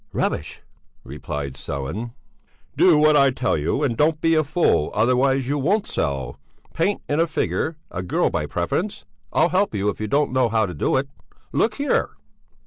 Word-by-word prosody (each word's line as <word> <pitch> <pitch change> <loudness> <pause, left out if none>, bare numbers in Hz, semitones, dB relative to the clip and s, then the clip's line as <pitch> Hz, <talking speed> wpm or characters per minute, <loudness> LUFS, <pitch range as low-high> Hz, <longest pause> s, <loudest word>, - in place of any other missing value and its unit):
"Rubbish!" - - -2 0.4
replied 70 -2 -5
Sellén. 70 - -5 0.6
"Do 175 -5 +5
what 155 0 +5
I 140 -1 +5
tell 130 -1 0
you, 80 - -1
and 125 -5 0
don't 150 +4 +2
be 165 +1 +2
a 155 -1 +3
fool, 150 - +1
otherwise 125 +3 +2
you 145 +1 0
won't 200 +9 +1
sell. 70 -2 -3 0.3
Paint 195 +5 0
in 145 - 0
a 165 - +3
figure; 160 0 -2
a 90 - -4
girl 90 - 0
by - - -2
preference; 165 - -2 0.3
I'll 165 +3 +3
help 185 - +1
you 100 +1 0
if 105 - -5
you 110 - -2
don't 140 +3 +1
know 130 -2 +2
how 110 -1 +2
to 90 - -6
do 80 - 0
it. 135 +1 -1 0.5
Look 215 -1 +1
here...." 285 0 0
135 Hz, 180 wpm, -22 LUFS, 100-160 Hz, 0.6 s, Do